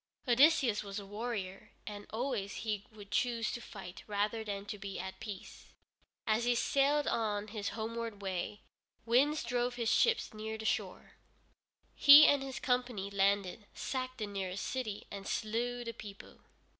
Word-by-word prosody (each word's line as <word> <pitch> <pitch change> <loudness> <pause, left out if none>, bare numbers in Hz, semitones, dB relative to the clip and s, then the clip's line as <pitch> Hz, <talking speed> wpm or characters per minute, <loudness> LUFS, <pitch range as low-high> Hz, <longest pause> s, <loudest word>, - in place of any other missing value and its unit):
Odysseus 255 -3 +5
was 200 0 -6
a 200 - -5
warrior, 205 -2 -5
and 205 -1 -7
always 225 -4 -2
he 210 -2 -2
would 205 -2 -13
choose 230 +1 +1
to 240 - -5
fight 190 -5 -9
rather 210 +2 -1
than 200 -2 -4
to 205 0 -6
be 195 -1 -6
at 190 0 -6
peace. 210 -4 -8 0.6
As 220 +1 +2
he 245 0 +2
sailed 280 +4 +2
on 210 -2 -1
his 205 -1 -3
homeward 225 -1 -4
way, 195 +1 -3 0.4
winds 275 +6 +3
drove 245 +1 -1
his 235 -2 0
ships 465 - +3
near 220 +1 -5
the 220 - -7
shore. - - -2 0.8
He 290 +1 +10
and 285 -1 +5
his 270 -1 -5
company 245 -6 -1
landed, 200 +1 +1
sacked 255 -1 -3
the 215 - -2
nearest 195 -2 -4
city, 235 -6 -3
and 200 -1 -7
slew 240 +3 -1
the 230 -1 -5
people. 205 -3 -11
220 Hz, 155 wpm, -33 LUFS, 200-245 Hz, 0.8 s, He